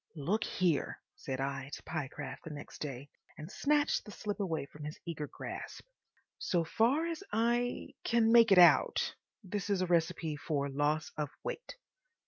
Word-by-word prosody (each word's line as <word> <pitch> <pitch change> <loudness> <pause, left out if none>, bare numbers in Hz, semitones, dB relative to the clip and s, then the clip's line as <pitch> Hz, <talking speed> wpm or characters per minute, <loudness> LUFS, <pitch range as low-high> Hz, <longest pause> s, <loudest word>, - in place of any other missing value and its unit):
"Look 180 +9 0
here," 175 -6 0 0.2
said 130 -1 -5
I 135 0 -3
to - - -12
Pyecraft 145 -2 -5
next 145 -1 -9
day, 140 -2 -5 0.3
and 155 +4 -8
snatched 295 +5 +2
the - - -12
slip 210 0 -4
away 165 -8 -1
from 150 +1 -12
his 150 +1 -6
eager 155 -3 -4
grasp. - - -7 0.5
"So 175 -2 +1
far 240 - +2
as 335 +2 -4
I—can 235 0 +1
make 230 -2 +7
it 195 - +7
out, 175 -1 +6 0.3
this 200 +1 -3
is 200 -2 +2
a 185 - +2
recipe 165 -2 +1
for 145 -2 -1
Loss 150 +2 0
of 150 -2 -1
Weight. - - -5
170 Hz, 155 wpm, -33 LUFS, 150-220 Hz, 0.5 s, make